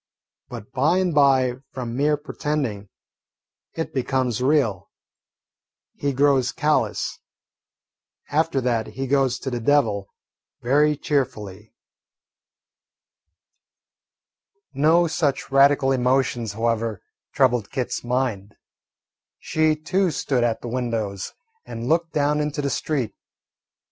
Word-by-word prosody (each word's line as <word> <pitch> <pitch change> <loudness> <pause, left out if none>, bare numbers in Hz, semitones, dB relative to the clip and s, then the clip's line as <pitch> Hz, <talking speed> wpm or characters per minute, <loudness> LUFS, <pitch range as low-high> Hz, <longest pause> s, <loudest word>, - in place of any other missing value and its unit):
But 105 - -9
by 145 +7 +2
and 185 -2 +1
by, 135 -4 +3 0.2
from 120 -3 -5
mere 150 +3 +2
pretending, 140 -9 -3 0.9
it 160 - -4
becomes 130 -2 -1
real. 130 - +1 1.0
He 145 - -2
grows 135 -2 +2
callous. 150 0 0 1.1
After 155 -2 +1
that 115 -3 0
he 135 - -5
goes 135 -2 +1
to 130 - -5
the 120 - -2
devil 110 -6 +2 0.6
very 145 +4 +3
cheerfully. 110 - -3 3.0
No 160 +5 +4
such 155 -5 -1
radical 135 0 +4
emotions, 125 -3 +1
however, 115 -1 -1 0.3
troubled 125 -6 +2
Kit's 130 -3 -3
mind. 120 -5 -2 0.8
She 155 0 +1
too 180 +5 0
stood 135 -5 0
at 115 -2 0
the - - -5
windows 115 -5 -3 0.3
and 115 +1 -6
looked 165 +2 +1
down 150 0 +1
into 150 -1 -2
the 140 - -1
street. 135 -8 -2
135 Hz, 105 wpm, -23 LUFS, 120-150 Hz, 3.0 s, No